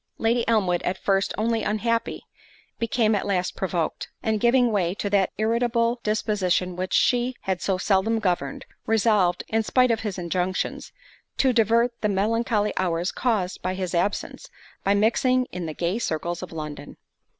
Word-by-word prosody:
Lady 235 +1 +1
Elmwood, 190 -6 +2
at 185 - -2
first 195 0 +1
only 225 +1 0
unhappy, 230 +2 -1 0.6
became 230 -2 +1
at 205 - -1
last 185 -2 -1
provoked; 175 -4 -2
and 220 -1 0
giving 240 +1 +3
way 185 -3 0
to 205 -1 -3
that 195 -2 +3
irritable 235 +2 +1
disposition 195 -4 0
which 185 +1 -4
she 245 +1 +2
had 190 -2 -2
so 190 -2 0
seldom 200 +4 +1
governed, 175 -10 -2 0.2
resolved, 210 -5 +2
in 225 0 +1
spite 250 +3 +3
of 225 - +1
his 210 -4 -4
injunctions, 180 +1 -2 0.5
to 260 -2 +3
divert 235 +1 +3
the 210 - +1
melancholy 210 +2 +1
hours 175 -1 0
caused 210 -7 -1
by 185 0 -2
his 185 -1 -3
absence, 180 +4 -2 0.3
by 200 +1 +3
mixing 250 +4 +2
in 180 -2 -5
the 155 - -4
gay 180 +6 -1
circles 170 -3 -2
of 185 - -7
London. 150 -2 -7
205 Hz, 160 wpm, -24 LUFS, 185-230 Hz, 0.6 s, giving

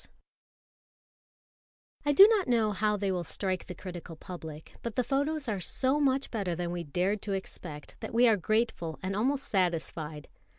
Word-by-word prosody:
_)] - - -10 2.0
I - - +5
DO 390 +8 +10
not 430 -6 +2
know 230 -3 +3
how 210 +1 +1
they 200 -1 0
will 180 -2 -1
strike 185 +3 -1
the 180 - -6
critical 175 -2 -8
public, 160 -3 -9
but 230 -2 -5
the 250 - +2
photos 285 +3 0
are 210 -4 -1
so 260 +10 +1
much 275 -1 +1
better 195 -6 -1
than 175 0 -3
we 175 -1 -3
dared 180 +7 0
to 205 - -3
expect, 170 -5 -6
that - - -6
we 240 +2 +5
are 225 - +6
grateful 205 -4 -1
and 190 +1 -2
almost 265 +6 0
satisfied. 165 -5 -1
200 Hz, 175 wpm, -30 LUFS, 175-245 Hz, 2.0 s, DO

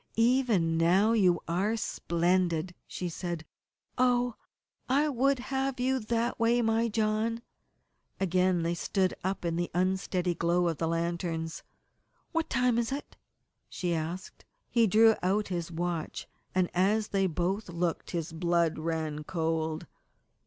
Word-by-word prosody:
"Even 225 -9 +3
now 185 +6 +4
you 185 -6 +4
are 195 +7 0
splendid," 175 -3 0
she 180 - -4
said. 170 -1 -4 0.5
"Oh, 245 -1 +3 0.6
I 285 +4 +3
would 275 +1 +2
have 265 +1 -2
you 260 +1 +1
that 230 +1 -1
way, 230 +1 +3
my 225 +1 +2
John!" 220 +1 0 0.8
Again 185 -1 +2
they 170 +1 0
stood 185 +1 0
up 190 -1 -2
in 165 -1 0
the 175 0 -1
unsteady 185 -1 0
glow 175 +1 +1
of 160 - -4
the 165 - 0
lanterns. 165 -1 -2 0.7
"What 330 -1 -1
time 250 -2 +2
is 235 +1 -1
it?" 280 +2 -5 0.5
she 175 -2 -2
asked. 165 +4 -5 0.3
He 230 -2 +4
drew 220 +3 +6
out 195 +3 +1
his 175 -2 -3
watch, 170 -1 -3 0.3
and 185 -1 +3
as 205 +4 +2
they 195 -1 +2
both 185 +5 -2
looked 170 0 -2
his 165 -1 -3
blood 170 -1 +1
ran 155 -2 -2
cold. 160 -1 -2
185 Hz, 140 wpm, -29 LUFS, 170-225 Hz, 0.8 s, drew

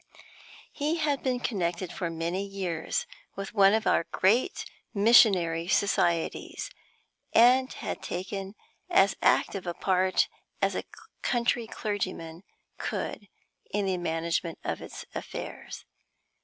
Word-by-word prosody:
He 300 +3 -1
had 295 -4 0
been 255 -2 0
connected 180 -6 -2
for 175 - -2
many 165 +4 -2
years 190 -5 -2 0.3
with 195 +2 -6
one 200 -1 +6
of 220 - -1
our - - +3
great 230 - +2 0.3
Missionary 190 -6 +5
Societies, 175 - 0 0.6
and 255 +3 +6
had - - -5
taken 195 +2 -5 0.3
as 195 0 +4
active 190 -2 +2
a 170 - -2
part 185 0 +2 0.3
as - - +1
a - - -3 0.4
country 240 -1 +1
clergyman 185 -7 -4 0.4
could 205 - -4 0.4
in 205 0 0
the 185 -2 0
management 165 0 -1
of - - -3
its - - -8
affairs. - - -7
195 Hz, 115 wpm, -28 LUFS, 175-220 Hz, 0.6 s, one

